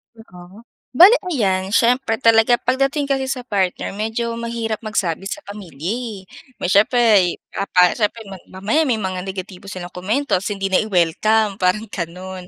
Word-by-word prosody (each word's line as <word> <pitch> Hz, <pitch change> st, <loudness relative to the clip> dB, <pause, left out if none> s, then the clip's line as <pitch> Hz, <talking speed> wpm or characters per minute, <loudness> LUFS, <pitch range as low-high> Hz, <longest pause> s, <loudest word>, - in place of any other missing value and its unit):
Oo. 195 Hz, -1 st, -15 dB, 0.3 s
Bale 360 Hz, -, +9 dB, 0.2 s
ayan, 195 Hz, -, 0 dB
siyempre 245 Hz, -1 st, +2 dB
talaga 230 Hz, +1 st, +5 dB
pagdating 275 Hz, +4 st, 0 dB
kasi 270 Hz, -1 st, -1 dB
sa 260 Hz, -1 st, -3 dB
partner, 195 Hz, -6 st, -2 dB
medyo 220 Hz, +3 st, -3 dB
mahirap 230 Hz, -2 st, -3 dB
magsabi 195 Hz, -4 st, -2 dB
sa 300 Hz, +9 st, -6 dB
pamilya 180 Hz, -5 st, -7 dB
eh. 230 Hz, -3 st, -5 dB, 0.4 s
May 180 Hz, -, -3 dB
siyempre 210 Hz, -3 st, +4 dB, 0.2 s
papa 180 Hz, -2 st, +2 dB
siyempre 220 Hz, +1 st, -1 dB, 0.2 s
mamaya 215 Hz, +12 st, 0 dB
may 245 Hz, -, +2 dB
mga 190 Hz, -3 st, -4 dB
negatibo 190 Hz, 0 st, -7 dB
silang 185 Hz, -3 st, -7 dB
komento 220 Hz, +11 st, -3 dB
tapos 190 Hz, -, -5 dB
hindi 195 Hz, -1 st, -3 dB
na 190 Hz, -, +4 dB
i-welcome, 210 Hz, +2 st, +1 dB
parang 185 Hz, +4 st, +1 dB
ganun. 180 Hz, +1 st, -7 dB
210 Hz, 150 wpm, -19 LUFS, 185-235 Hz, 0.4 s, Bale